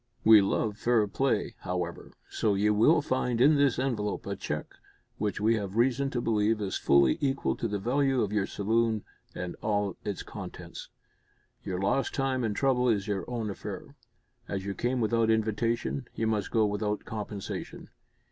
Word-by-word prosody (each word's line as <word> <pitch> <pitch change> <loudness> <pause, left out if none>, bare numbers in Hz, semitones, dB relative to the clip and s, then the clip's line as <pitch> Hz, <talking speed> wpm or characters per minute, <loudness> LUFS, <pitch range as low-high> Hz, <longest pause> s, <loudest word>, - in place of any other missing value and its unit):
We 110 -1 +8
love 105 +2 -1
fair 120 -3 +3
play, 135 +6 0
however, 90 -2 -4
so 105 -2 0
you 105 +2 +2
will 145 +9 +4
find 125 -3 0
in 140 +5 +6
this 140 -3 +3
envelope 115 -6 -2
a - - -3
cheque - - -5 0.5
which 105 -3 -1
we 110 +2 +3
have 100 -2 -5
reason 130 +3 +2
to 125 - -2
believe 110 -1 +1
is 100 -2 -2
fully 70 -2 +3
equal 140 -1 0
to 115 - -1
the 105 -1 -2
value 130 +4 +1
of 105 0 -3
your 100 -2 +1
saloon 110 +1 0 0.3
and 90 -1 -5
all 105 -3 0
its 100 -3 -4
contents. - - -9 0.7
Your 90 -1 -3
lost 100 +8 0
time 135 -2 0
and 110 -3 -1
trouble 125 -1 +2
is 105 -3 +1
your 100 -2 -2
own 115 -4 -2
affair. - - -8 0.5
As 95 -1 -4
you 100 - -2
came 125 +4 -1
without 115 0 +2
invitation, 110 - 0
you 110 - -1
must 110 -2 0
go 110 -2 +3
without 105 0 -2
compensation. 105 -2 -6
110 Hz, 170 wpm, -29 LUFS, 100-120 Hz, 0.7 s, We